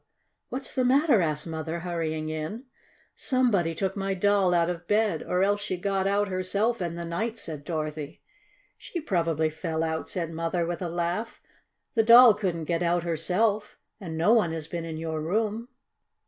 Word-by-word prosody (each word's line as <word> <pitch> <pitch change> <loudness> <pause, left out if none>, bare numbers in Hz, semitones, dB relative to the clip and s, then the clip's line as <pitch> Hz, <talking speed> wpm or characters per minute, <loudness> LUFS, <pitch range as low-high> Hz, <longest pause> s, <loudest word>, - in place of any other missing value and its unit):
"What's 270 +2 -4
the 260 - +1
matter?" 270 - +4
asked 155 -2 -1
Mother, 160 +1 -4
hurrying 160 -3 -3
in. 155 +10 -4 0.5
"Somebody 205 -11 +1
took 190 +2 -2
my 195 -1 -1
Doll 200 -1 +3
out 170 -1 +3
of 175 -1 -4
bed, 210 -6 +2
or 180 +1 0
else 205 +1 +1
she 205 -3 -3
got 195 +1 0
out 205 +1 +2
herself 200 +4 -1
in 170 -1 -2
the 170 0 -5
night!" 220 +8 -3
said 155 -8 -7
Dorothy. 155 -2 -5 0.6
"She 350 - -5
probably 165 - 0
fell 160 0 -3
out," 160 0 -2
said 170 -3 -3
Mother, 165 +1 -1
with 170 +1 -4
a 175 - -2
laugh. 175 +6 -2 0.5
"The 230 - +4
Doll 235 +1 +9
couldn't 185 -6 -2
get 170 +1 -1
out 175 0 +1
herself, 190 +6 0 0.2
and 165 -5 -6
no 175 +8 +4
one 180 -9 +3
has 160 -2 -5
been 170 -1 -4
in 160 -1 -5
your 160 -1 -3
room." 215 +7 -1
175 Hz, 175 wpm, -27 LUFS, 165-205 Hz, 0.6 s, Doll